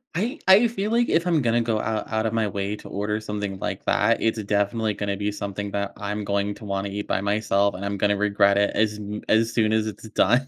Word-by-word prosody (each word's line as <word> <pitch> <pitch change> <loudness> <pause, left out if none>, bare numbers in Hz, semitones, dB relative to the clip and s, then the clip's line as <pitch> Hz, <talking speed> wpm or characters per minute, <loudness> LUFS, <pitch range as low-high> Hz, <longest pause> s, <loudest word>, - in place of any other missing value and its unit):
I 235 - -2
I 200 +5 +7
feel 215 -2 -3
like 240 +1 +2
if 165 +1 +2
I'm 170 -4 +2
gonna 120 -1 +2
go 115 -2 0
out 110 -1 -3
out 110 0 0
of 110 - -1
my 110 -2 +1
way 100 +1 -3
to - - -12
order 105 +2 -2
something 105 -2 -4
like - - -4
that, - - +2
it's 110 -1 +1
definitely 105 +2 0
gonna 100 0 -3
be 105 +1 -1
something 100 0 -5
that 100 0 -2
I'm 105 0 -3
going 100 0 -1
to 110 - -11
wanna 100 0 -2
eat 105 +1 -5
by 95 - 0
myself, 100 -1 +1
and 95 +2 -5
I'm 100 0 -2
gonna 100 +1 +2
regret 100 -1 +3
it 100 0 +2
as 105 0 +1
m 105 0 -5
as 115 +1 +3
soon 110 -2 +2
as 110 0 +1
it's 110 +1 -7
done. 120 +7 +2
105 Hz, 245 wpm, -24 LUFS, 100-115 Hz, -, I